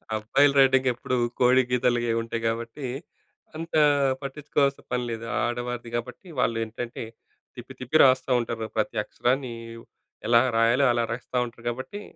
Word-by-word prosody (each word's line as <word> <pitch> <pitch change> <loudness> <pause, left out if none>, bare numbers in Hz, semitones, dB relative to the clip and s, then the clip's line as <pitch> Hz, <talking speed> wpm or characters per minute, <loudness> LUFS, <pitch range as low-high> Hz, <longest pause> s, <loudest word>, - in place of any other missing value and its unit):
అబ్బాయిలు 140 +7 +2
రైటింగ్ 130 -1 +4
ఎప్పుడు 125 +1 -3 0.2
కోడి 125 +1 +5
గీతలు 125 -1 +2
గే - - -1
ఉంటాయి 115 0 -4
కాబట్టి, 115 +4 -4 0.7
అంత 165 +1 -7 0.5
పట్టించుకోవాల్సిన 140 0 -1
పని 125 0 0
లేదు. 115 0 -5 0.2
ఆడవారిది 120 0 -3
కాబట్టి, 125 +9 -8
వాళ్ళు 115 -2 +1
ఏంటంటే 115 +2 -6 0.5
తిప్పి, - - -10
తిప్పి 130 +5 +1
రాస్తుంటారు. 120 -3 +2
ప్రతి 110 - -1
అక్షరాన్ని 125 +2 -1 0.7
ఎలా 115 0 +6 0.2
రాయాలో, 115 +4 +4
అలా 120 0 +1
రాస్తా 125 +1 -4
ఉంటారు 115 -1 -12
కాబట్టి, 130 - -6
125 Hz, 135 wpm, -25 LUFS, 115-130 Hz, 0.7 s, ఎలా